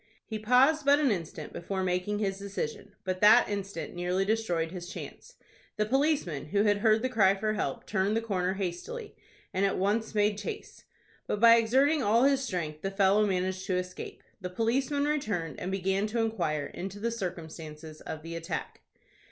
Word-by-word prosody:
He 220 -1 -5
paused 260 +8 +4
but 280 +1 +5
an 290 -4 +2
instant 165 -5 -4
before 190 +2 -3
making 180 +3 0
his 195 -2 -1
decision; 200 0 -5
but 185 0 -3
that 215 +4 +7
instant 195 -6 -4
nearly 180 +2 0
destroyed 185 -7 0
his 180 -1 -7
chance. - - -9 0.4
The 210 - +2
policeman, 270 - 0
who 200 +6 +1
had 205 -1 +3
heard 220 +1 +3
the - - +2
cry 200 -6 +4
for 215 +2 -1
help, 140 -10 -3
turned 205 +1 0
the - - 0
corner 190 -4 -1
hastily, 195 - -5 0.4
and 190 - 0
at 195 - +1
once 215 +4 0
made 205 0 +2
chase. 205 - -7 0.4
But 210 - -1
by 230 +1 +8
exerting 270 +7 +3
all 230 +1 +3
his 275 -1 +3
strength 160 - -3
the 195 - -2
fellow 200 +1 +3
managed 185 0 -1
to 185 - +1
escape. 180 0 -6 0.2
The 180 - -4
policeman 260 +8 0
returned, 210 - -2
and 185 - -3
began 195 +2 0
to 230 +2 -2
inquire 175 -10 0
into 195 +6 -7
the 235 +2 -1
circumstances 160 -6 -7
of 155 -1 -7
the 165 0 -6
attack. 165 -1 -5
200 Hz, 180 wpm, -29 LUFS, 180-225 Hz, 0.4 s, by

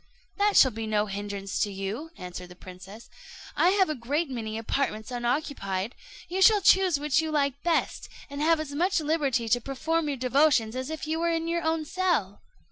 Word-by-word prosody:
"That 410 0 +3
shall 260 - +7
be 225 0 -5
no 210 -1 +1
hindrance 200 -1 -5
to 205 - 0
you," 195 +11 -5
answered 180 0 -8
the 180 - -12
princess; 185 +5 -12 0.5
"I 350 - +4
have 385 0 +3
a 310 - -1
great 285 +4 -2
many 220 -3 -4
apartments 225 -1 -2
unoccupied; 240 -5 -2 0.3
you 375 +2 -3
shall 420 +2 +7
choose 375 -5 +4
which 300 +1 +2
you 320 - -3
like 280 -2 0
best, 340 -2 -1 0.2
and 285 0 -6
have 325 +1 +3
as 305 -2 -5
much 355 +5 +1
liberty 290 -6 0
to 245 +2 +2
perform 310 +5 -1
your 285 -2 -2
devotions 255 -3 +2
as 260 +2 -4
if 315 -1 -5
you 320 +1 -2
were 340 0 +1
in 330 0 -1
your 340 0 0
own 320 -1 -1
cell." 330 - -1
280 Hz, 195 wpm, -27 LUFS, 220-325 Hz, 0.5 s, shall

